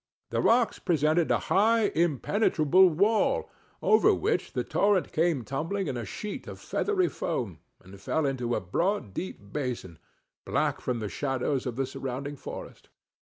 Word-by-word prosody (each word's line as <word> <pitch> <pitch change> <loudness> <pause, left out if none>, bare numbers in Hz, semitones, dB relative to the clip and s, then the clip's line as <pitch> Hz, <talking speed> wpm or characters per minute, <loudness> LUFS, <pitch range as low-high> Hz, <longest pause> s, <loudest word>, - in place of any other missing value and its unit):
The - - +1
rocks 235 0 +3
presented 160 -1 +2
a - - +4
high 220 +2 +3
impenetrable 175 - +3
wall 200 +7 +2 0.4
over 435 - +5
which - - -1
the - - -1
torrent 200 -2 +1
came 160 -5 +1
tumbling 165 - -2
in 130 - -3
a 120 -2 -4
sheet 210 - -6
of - - -8
feathery 390 -4 0
foam, 115 - -3 0.2
and 95 +1 -14
fell 160 +9 0
into 125 -3 -1
a - - -1
broad 165 - -1
deep 100 - -7
basin, 125 - -4 0.4
black - - 0
from 120 -2 -2
the 105 - -2
shadows 135 +2 -1
of 120 - -3
the 135 +1 0
surrounding 135 +2 -5
forest. - - -9
150 Hz, 155 wpm, -28 LUFS, 125-195 Hz, 0.4 s, over